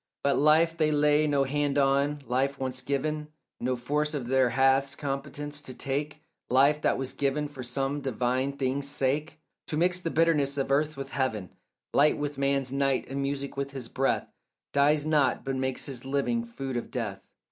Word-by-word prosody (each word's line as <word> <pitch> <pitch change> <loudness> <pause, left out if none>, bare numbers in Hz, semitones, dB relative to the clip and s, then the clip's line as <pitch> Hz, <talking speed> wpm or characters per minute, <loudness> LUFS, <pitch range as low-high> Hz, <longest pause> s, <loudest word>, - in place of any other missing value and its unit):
But 140 - +2
life 160 +3 +4
they 155 -2 +2
lay 150 0 +3
no 140 -2 +2
hand 145 +1 0
on; 140 +1 +2
life 135 +3 0
once 130 -1 -3
given 150 +3 -2 0.3
No 125 +1 0
force 150 +5 -1
of 135 -4 -3
theirs 130 -2 +3
hath 135 +1 +3
competence 145 +1 -4
to 130 -3 -9
take; 145 +3 -3 0.3
Life 140 +4 +4
that - - +2
was 135 -1 -3
given 145 +1 0
for 145 -3 -9
some 135 +3 -2
divine 130 +1 0
thing's 135 0 -1
sake, 145 +2 0 0.3
To 150 - -2
mix 180 +2 +2
the 165 - -2
bitterness 150 -4 +2
of 135 0 -1
earth 150 +2 +1
with 135 0 -6
heaven, 110 -9 -2 0.4
Light 150 +2 +4
with 145 -1 -4
man's 135 -1 +1
night, 135 -1 +1
and 135 +1 -3
music 140 0 -3
with 140 0 -3
his 125 -4 -6
breath, 135 +1 0 0.5
Dies 145 +1 +3
not, 150 -5 +2
but 135 0 -1
makes 130 0 -2
its 130 -4 -5
living 140 - 0
food 135 - -5
of 120 - -4
death. - - -4
140 Hz, 180 wpm, -28 LUFS, 135-150 Hz, 0.5 s, life